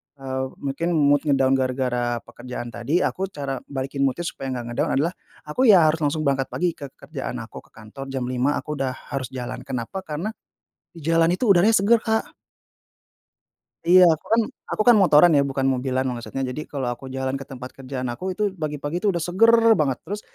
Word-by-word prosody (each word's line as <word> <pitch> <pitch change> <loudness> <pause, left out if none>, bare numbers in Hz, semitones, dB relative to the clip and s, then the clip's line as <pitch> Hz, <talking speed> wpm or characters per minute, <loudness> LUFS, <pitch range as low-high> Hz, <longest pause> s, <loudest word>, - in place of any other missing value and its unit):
eee, 130 -1 -3 0.2
mungkin 140 +5 -2
mood 145 -1 +4
nge-down 135 -2 +3
gara-gara 130 -1 0 0.2
pekerjaan 120 -1 -8
tadi, 130 +10 0
aku 190 +1 -1
cara 140 -6 -5
balikin 135 0 -5
mood-nya 170 +7 -3
supaya 135 -5 -5
nggak 120 -1 -5
nge-down - - -1
adalah 165 +6 +1 0.3
aku 230 +12 +1
ya 190 -6 +8
harus 160 - -4
langsung 155 +1 0
berangkat 135 -2 +1
pagi 175 -1 -1
ke 140 - -6
kerjaan 135 -5 -6
aku, 110 - -12
ke - - -33
kantor 115 +5 -10
jam 135 -2 -3
05.00 125 +3 0
aku 150 - -5
udah 130 -1 -1 0.2
harus 135 -3 -2
jalan, 125 -1 -5
kenapa 130 +8 -4
karena 175 +4 -4 0.6
di 165 - -11
jalan 165 +1 +3
itu 250 - -5
udaranya 200 +5 +5
seger, 220 +4 +4
Kak. 220 0 -1 1.5
Iya 180 +2 +7
aku 155 - -13
kan 230 - +5 0.3
aku 215 - +1
kan 235 - +8
motoran 175 -3 +6
ya, 140 - +5
bukan 135 -1 -1
mobilan, 130 0 0
maksudnya 125 +2 -4
jadi 150 +4 -5
kalau 135 -4 -4
aku 135 - -16
jalan 130 0 -2
ke 135 - -7
tempat 125 0 -8
kerjaan 130 -1 -5
aku, 185 +11 -4
itu 210 +3 -4
pagi-pagi 155 +2 -4
tuh 205 - +4
udah 170 - -2
seger 190 +8 +4 0.3
banget, 135 -4 +1
terus 205 +2 -4
140 Hz, 190 wpm, -23 LUFS, 130-170 Hz, 1.5 s, ya